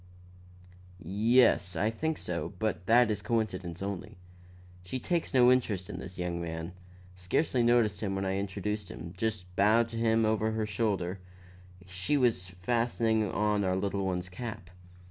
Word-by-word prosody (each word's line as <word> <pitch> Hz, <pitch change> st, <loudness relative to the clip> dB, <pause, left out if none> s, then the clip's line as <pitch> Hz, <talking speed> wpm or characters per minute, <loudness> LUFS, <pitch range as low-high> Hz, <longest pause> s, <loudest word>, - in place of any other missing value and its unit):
"Yes, 105 Hz, +1 st, +3 dB
I 105 Hz, +6 st, +1 dB
think 160 Hz, +7 st, -2 dB
so; 85 Hz, +2 st, -4 dB
but 105 Hz, -2 st, -2 dB
that 120 Hz, 0 st, +5 dB
is 105 Hz, -1 st, -2 dB
a -, -, -21 dB
coincidence 95 Hz, -7 st, -2 dB
only. 100 Hz, +1 st, -5 dB, 0.7 s
She 90 Hz, +8 st, -4 dB
takes 170 Hz, +6 st, -1 dB
no 125 Hz, -1 st, +6 dB
interest 105 Hz, -6 st, 0 dB
in -, -, -6 dB
this 95 Hz, 0 st, -9 dB
young 90 Hz, -1 st, -2 dB
man; 80 Hz, 0 st, -5 dB, 0.4 s
scarcely 120 Hz, -, 0 dB
noticed 115 Hz, -4 st, +3 dB
him 100 Hz, -3 st, -1 dB
when 95 Hz, 0 st, -2 dB
I 95 Hz, 0 st, 0 dB
introduced 100 Hz, +1 st, -3 dB
him; 85 Hz, +1 st, -8 dB
just 95 Hz, -3 st, -3 dB
bowed 110 Hz, +4 st, +4 dB
to 115 Hz, -, -6 dB
him 115 Hz, -1 st, +3 dB
over 110 Hz, 0 st, +1 dB
her 110 Hz, -1 st, -1 dB
shoulder; 100 Hz, -3 st, -1 dB, 0.7 s
she 95 Hz, +10 st, -1 dB
was 115 Hz, -9 st, +1 dB
fastening 115 Hz, -1 st, +1 dB
on 105 Hz, -1 st, +1 dB
our 95 Hz, -1 st, +1 dB
little 100 Hz, +1 st, -1 dB
one's 90 Hz, -1 st, -2 dB
cap. 105 Hz, -1 st, -7 dB
105 Hz, 160 wpm, -30 LUFS, 95-115 Hz, 0.7 s, no